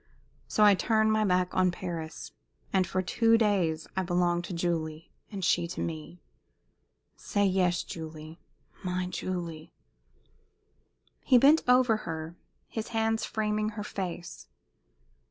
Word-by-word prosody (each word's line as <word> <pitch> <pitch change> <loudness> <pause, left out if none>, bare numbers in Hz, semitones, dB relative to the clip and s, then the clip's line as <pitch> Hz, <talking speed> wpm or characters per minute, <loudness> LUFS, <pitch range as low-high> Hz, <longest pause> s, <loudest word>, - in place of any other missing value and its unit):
So 215 - +2
I 205 -1 +8
turn 220 +2 +2
my 215 0 +2
back 180 -2 +1
on 185 -1 +3
Paris, 170 -3 -6 0.4
and 190 -2 +3
for 185 +2 -1
two 230 +5 +3
days 180 -8 +1
I 190 - +1
belong 175 -1 +1
to 175 - -8
Julie 165 -2 -3 0.2
and 195 -4 -3
she 175 -1 +2
to 180 - -7
me. 160 +1 -5 1.0
Say 205 -1 0
yes, 185 -2 +2
Julie 160 0 -8 0.4
my 180 0 -1
Julie!" 175 -3 -5 1.5
He 255 - +5
bent 285 +6 +6
over 250 -3 +5
her, 165 -3 -6 0.3
his 220 -1 -5
hands 225 -1 0
framing 215 -1 -1
her 210 - -3
face. 180 -4 -6
185 Hz, 130 wpm, -29 LUFS, 170-215 Hz, 1.5 s, I